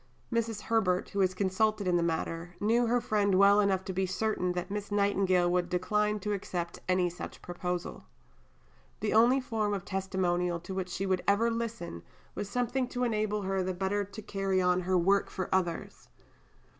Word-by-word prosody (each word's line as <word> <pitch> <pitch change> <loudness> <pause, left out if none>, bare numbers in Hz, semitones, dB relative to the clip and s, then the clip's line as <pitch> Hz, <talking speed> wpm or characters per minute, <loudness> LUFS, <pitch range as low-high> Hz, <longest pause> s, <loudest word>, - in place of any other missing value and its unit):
Mrs. 225 -2 -1
Herbert, 195 -6 +1
who 200 - -3
was 185 -1 +2
consulted 200 +2 +1
in 180 - +3
the 175 - +3
matter, 165 +1 -2
knew 230 +3 +2
her 245 +2 +3
friend 205 -4 +1
well 200 +2 +6
enough 195 -2 +2
to 190 - -4
be 190 +1 0
certain 185 -2 -1
that 180 +2 -4
Miss 205 0 -4
Nightingale 195 -3 +2
would 175 0 +1
decline 210 +4 +1
to 210 +1 -1
accept 175 -3 -4
any 185 -1 +3
such 175 0 -8
proposal. 180 0 -4 1.0
The 215 - 0
only 240 +5 +5
form 215 -5 -1
of 195 -1 -6
testimonial 180 -3 -1
to 190 - -7
which 190 -1 -3
she 190 +2 -3
would 185 -1 +1
ever 225 +4 +3
listen 230 - -4 0.3
was 205 - -5
something 250 +3 0
to 250 0 -3
enable 215 -3 0
her 190 0 0
the 185 0 -2
better 195 +2 0
to 205 +3 -9
carry 195 -2 0
on 180 0 +3
her 185 0 +1
work 195 +3 +3
for 185 - -4
others. 175 -3 -2
195 Hz, 180 wpm, -30 LUFS, 180-210 Hz, 1.0 s, well